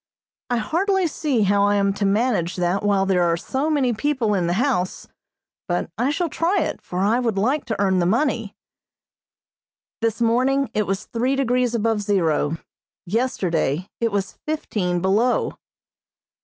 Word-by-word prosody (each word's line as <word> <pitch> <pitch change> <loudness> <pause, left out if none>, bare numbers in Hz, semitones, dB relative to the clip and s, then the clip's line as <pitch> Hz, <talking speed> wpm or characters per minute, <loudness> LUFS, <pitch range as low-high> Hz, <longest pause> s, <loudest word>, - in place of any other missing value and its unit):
I 245 - +1
hardly 370 - +1
see 290 -7 0
how 200 +1 +3
I 205 0 +3
am 200 -1 +2
to 200 0 0
manage 205 -4 +1
that 180 +2 0
while 200 -2 +2
there 190 -2 +2
are 170 -1 +2
so 270 - -2
many 275 -6 +2
people 235 -2 0
in 180 -4 +1
the 175 - +1
house, 235 -8 0 0.6
but 175 -1 -2
I 245 +5 0
shall 340 +4 0
try 340 +5 0
it, - - -3
for 180 +1 -4
I 215 +5 +2
would 230 -5 -1
like 260 +9 +1
to 220 - -3
earn 190 -2 +2
the 175 - +2
money. 230 -1 0 1.5
This 225 0 0
morning 255 +2 +2
it 210 -3 0
was 195 +1 -2
three 250 +4 -1
degrees 250 -2 +1
above 225 -1 +1
zero; 165 -6 +1 0.5
yesterday 180 - -1
it 230 -1 0
was 200 -1 -3
fifteen 190 - -1
below. 210 +7 +1
215 Hz, 160 wpm, -22 LUFS, 195-255 Hz, 1.5 s, how